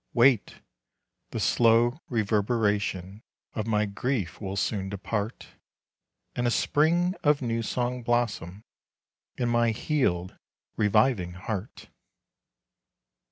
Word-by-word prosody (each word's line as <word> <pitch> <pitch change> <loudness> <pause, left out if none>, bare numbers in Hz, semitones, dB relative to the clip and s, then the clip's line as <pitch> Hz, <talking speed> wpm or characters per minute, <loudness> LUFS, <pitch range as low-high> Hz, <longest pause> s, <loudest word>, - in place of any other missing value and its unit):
Wait! 120 -2 +3 0.7
the - - -4
slow 120 +3 +3
reverberation 105 -3 0 0.3
Of 110 0 -3
my 105 -1 +2
grief 100 -2 -3
will 95 -1 -4
soon 95 -1 -1
depart, 100 +2 -4 0.9
And 120 0 0
a - - +3
spring 170 +8 +2
of 145 -2 +3
new 115 -1 -1
song 125 +2 -2
blossom 110 -5 -1 0.7
In 120 - 0
my 120 0 +3
healed, 110 - 0 0.4
reviving 105 -3 +2
heart. 95 +3 -6
115 Hz, 100 wpm, -27 LUFS, 100-120 Hz, 0.9 s, Wait